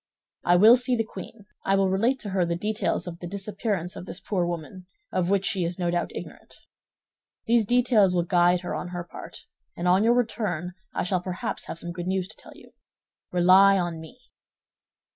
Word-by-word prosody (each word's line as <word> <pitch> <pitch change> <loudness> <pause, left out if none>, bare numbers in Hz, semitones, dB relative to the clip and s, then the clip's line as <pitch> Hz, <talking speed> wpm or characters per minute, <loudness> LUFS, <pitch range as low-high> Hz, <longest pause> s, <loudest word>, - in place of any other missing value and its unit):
I 175 - +4
will 220 +7 +8
see 250 0 +1
the 225 - 0
queen; 215 -1 -10 0.2
I 195 - +2
will 195 -1 +2
relate 230 +8 +2
to 205 - -6
her 190 -1 +1
the 170 0 -1
details 210 +4 -1
of 170 -1 -7
the 175 - -6
disappearance 200 -1 -3
of 180 - -8
this 180 - -4
poor 180 -4 -1
woman, 175 +2 -6 0.2
of 180 -1 0
which 195 -1 +2
she 200 -5 0
is 170 +1 -3
no 175 -2 -1
doubt 175 0 -1
ignorant. - - -9 0.9
These 230 -2 +3
details 235 -6 +3
will 175 - +2
guide 175 0 +3
her 180 - -4
on - - -4
her 175 -1 -5
part, 170 - -11 0.3
and 175 - -2
on 185 +3 +4
your 235 +2 +4
return, 205 -8 -1 0.2
I - - -2
shall 180 0 0
perhaps 180 0 -4
have - - -6
some 175 +1 -5
good 175 +1 -6
news 190 -1 -1
to 220 - -7
tell - - -13
you. - - -17 0.6
Rely 185 +3 +6
on 175 -3 -2
me." 160 +11 -12
185 Hz, 200 wpm, -26 LUFS, 175-210 Hz, 0.9 s, will